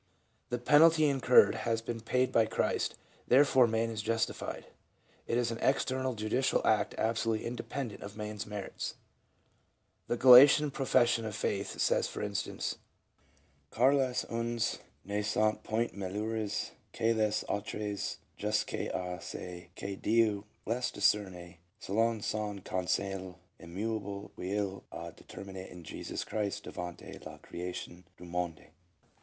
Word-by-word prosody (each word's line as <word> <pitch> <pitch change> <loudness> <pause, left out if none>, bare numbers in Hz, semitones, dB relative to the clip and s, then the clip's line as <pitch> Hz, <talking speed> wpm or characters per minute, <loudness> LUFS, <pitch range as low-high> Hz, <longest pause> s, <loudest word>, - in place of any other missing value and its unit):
The 120 - -1
penalty 155 +5 +6
incurred 135 -3 +5
has 115 -1 -1
been 115 0 -5
paid 125 +2 +1
by 115 -3 +4
Christ, - - 0 0.3
therefore 130 -1 +6
man 115 0 0
is 110 -1 -3
justified. 115 0 -2 0.6
It 115 - +1
is 120 -1 +1
an 115 - -4
external 130 -1 +1
judicial 110 +5 +1
act - - +2
absolutely 115 0 0
inde 120 0 -3
pendent 130 -7 -4
of 100 +1 -8
man's 105 -1 -5
merits. 105 -2 -5 1.1
The 120 - 0
Gallican 135 +4 +9
profession 120 -4 +2
of 110 -2 -4
faith 100 -2 -2
says - - +2
for - - -5
instance: 100 -1 -3 0.9
"Car 130 - +4
les 130 -3 +1
uns 115 0 -1 0.3
ne 100 +2 -1
sont 105 +1 +1
point 115 +2 -1
meilleurs 105 +2 -2 0.2
que 115 0 +2
les 110 -1 +1
autres 105 0 -3 0.2
jusqu 105 +1 -1
1 90 - -2
a 90 0 -5
ce 90 -1 -7
que 100 0 -5
Dieu 110 -2 +2 0.2
les 120 +3 0
discerne, 90 -4 0 0.2
selon 110 +2 +1
son 105 -1 -2
conseil 95 0 -2 0.2
im 85 +1 -11
mudble 100 -1 -3
qu'il 95 0 -2
a - - -7
determini 95 -1 -9
en 90 - -10
Jesus 75 - -5
Christ 105 -2 -3
devanl 90 -1 -7
la - - -9
crSation 90 0 -7 0.2
du 90 - -11
monde." 85 -2 -3
110 Hz, 135 wpm, -31 LUFS, 100-120 Hz, 1.1 s, Gallican